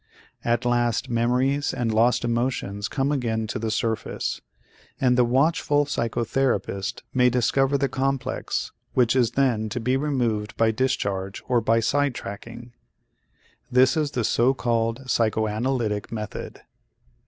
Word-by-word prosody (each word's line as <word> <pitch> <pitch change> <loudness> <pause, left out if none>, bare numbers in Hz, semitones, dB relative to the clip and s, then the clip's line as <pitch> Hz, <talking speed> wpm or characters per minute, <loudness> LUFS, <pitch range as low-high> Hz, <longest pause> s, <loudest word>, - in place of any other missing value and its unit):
At 120 +1 0
last 120 +1 +1
memories 125 +4 +1
and 115 -2 -1
lost 120 +2 +3
emotions 115 -4 -1
come 135 +7 -1
again 115 -6 -1
to 110 - -4
the 110 0 -2
surface, 110 0 -2 0.6
and 125 -2 +3
the 125 - +4
watchful 145 +3 +2
psychotherapist 120 -5 -1
may 125 -1 +4
discover 135 +3 +2
the 140 0 +1
complex, 135 0 -2 0.2
which 125 -1 +3
is 120 -3 +2
then 115 -6 +2
to 120 - -3
be 125 +3 +1
removed 120 -7 -1
by 115 -1 +3
discharge 100 -6 -2
or 125 -2 +2
by 115 +1 +2
side 145 +3 +1
tracking. 115 +4 -8 1.0
This 125 0 +5
is 155 -2 +1
the 125 -4 -2
so 120 +5 +2
called 115 0 -1
psychoanalytic 110 -1 0
method. 105 -2 -6
120 Hz, 130 wpm, -24 LUFS, 115-130 Hz, 1.0 s, This